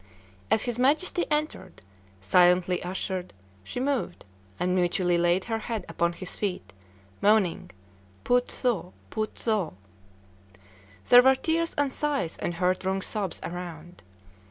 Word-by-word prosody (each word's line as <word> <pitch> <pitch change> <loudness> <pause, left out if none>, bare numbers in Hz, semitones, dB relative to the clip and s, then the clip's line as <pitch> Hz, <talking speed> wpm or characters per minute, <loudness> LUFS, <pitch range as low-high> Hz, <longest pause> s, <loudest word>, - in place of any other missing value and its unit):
As 220 - +3
his 240 -1 -3
Majesty 310 +7 +2
entered, 300 - -3 0.4
silently 180 - +4
ushered, 185 0 -4 0.3
she 95 - -5
moved, 265 -8 -2 0.3
and 180 0 +1
mutely 180 0 +2
laid 175 +2 +2
her 225 -1 -2
head 220 -4 -4
upon 170 0 0
his 180 +1 -7
feet, 185 - -4 0.5
moaning, 205 -4 +2 0.5
Poot 245 0 +2
tho! 215 -8 -2 0.2
Poot 215 -1 -3
tho! 210 - -1 1.3
There 245 - +9
were 265 +1 +5
tears 330 +4 -1
and 285 -2 0
sighs 285 - -1
and 175 - -2
heart 180 +2 0
wrung 190 0 -1
sobs 200 -5 -3
around. 175 -1 -7
190 Hz, 130 wpm, -27 LUFS, 175-245 Hz, 1.3 s, There